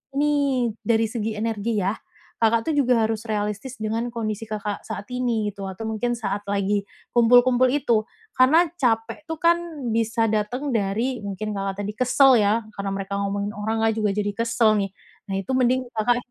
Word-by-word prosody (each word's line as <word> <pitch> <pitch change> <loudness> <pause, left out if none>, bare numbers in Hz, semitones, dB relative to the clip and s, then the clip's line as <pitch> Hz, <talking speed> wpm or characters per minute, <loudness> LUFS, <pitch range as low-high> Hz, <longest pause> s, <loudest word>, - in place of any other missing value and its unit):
ini 280 -4 +2 0.2
dari 225 0 +3
segi 220 -1 -3
energi 220 0 -1
ya, 195 +3 +1 0.5
Kakak 225 +5 +2
tuh - - -1
juga 250 -4 +3
harus 225 +1 -3
realistis 210 +4 -3
dengan 225 +2 -1
kondisi 220 -1 -3
Kakak 210 -1 -4
saat 200 - -6
ini, 235 -4 0
gitu, 195 -1 -8
atau 190 +4 -7
mungkin 240 +2 -1
saat 205 -3 -3
lagi 200 0 0 0.3
kumpul-kumpul 245 +2 +5
itu, 240 -6 +1 0.3
karena 315 +7 +5
capek 225 +1 0
itu 325 - -3
kan 340 0 +5 0.4
bisa 225 0 +1
dateng 245 +7 -1
dari 225 +5 0
mungkin 210 +2 -4
Kakak 195 0 -3
tadi 210 +1 -4
kesel 255 0 +5
ya, 210 +3 +2 0.2
karena 200 0 -3
mereka 200 0 -3
ngomongin 200 +1 -2
orang 220 +2 -1
Kakak 225 -1 +2
juga 210 -1 +1
jadi 205 -1 0
kesel, 230 -1 +2
nih. 195 -1 -2 0.4
Nah, 195 - -2
itu 265 - -6
mending 255 +1 +3
Kakak 235 +2 +2
225 Hz, 175 wpm, -23 LUFS, 205-245 Hz, 0.5 s, kumpul-kumpul